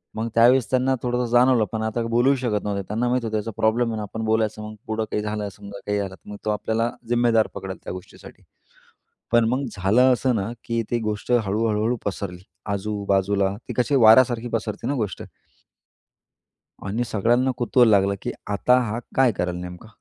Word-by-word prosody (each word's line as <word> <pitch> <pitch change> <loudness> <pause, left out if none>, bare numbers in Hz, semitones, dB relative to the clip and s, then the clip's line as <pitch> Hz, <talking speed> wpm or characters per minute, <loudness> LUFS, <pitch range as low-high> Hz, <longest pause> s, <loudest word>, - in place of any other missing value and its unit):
मग 110 +1 -2
त्यावेळेस 120 +2 +5
त्यांना 130 +1 +2
थोडंसं 125 0 0
जाणवलं. 120 -2 +4
पण 110 -1 -3
आता 110 +1 -1
बोलूही 125 +4 +3
शकत 115 -5 -1
नव्हते. 100 -1 -2
त्यांना 115 +4 -1
माहीत 125 -1 0
होतं 110 -1 -1
याचा 110 +2 -4
प्रॉब्लेम 115 +2 +2
आहे 110 - -3
ना, 105 - -3
आपण 110 +2 -5
बोलायचं, 110 -1 0
मग 110 - -10
पुढं 110 0 -1
काही 105 - 0
झालं 105 -1 -3
समजा? 100 0 -10
काही 105 0 0
झालं? 95 -2 -4
तर - - -17
मग 105 - -7
तो - - 0
आपल्याला 110 +2 -1 0.2
जिम्मेदार 120 -2 +3
पकडेल 95 0 -6
त्या - - -5
गोष्टीसाठी. 90 +1 -12 0.9
पण 120 -1 +5
मग 130 +3 0
झालं 115 +8 +4
असं 125 0 +1
ना 100 +3 -2
की 115 -1 -1
ती 120 - +1
गोष्ट 110 +2 -3
हळू-हळू 110 +1 +1
पसरली. 95 -3 -4 0.3
आजू-बाजूला 100 -1 0
ती - - -3
कशी 125 +3 +1
वाऱ्यासारखी 120 0 +5
पसरते 110 0 -3
ना 140 - 0
गोष्ट. 105 -8 -3 1.7
आणि 110 +5 -1
सगळ्यांना 120 +5 +1
कुतूहल 120 -1 +4
लागलं 100 -1 +3
की - - -3 0.2
आता 125 +5 +3
हा 110 +3 -3 0.2
काय 130 -3 +4
करेल 90 -2 -2
नेमका, 90 +4 -8
110 Hz, 185 wpm, -23 LUFS, 100-120 Hz, 1.7 s, त्यावेळेस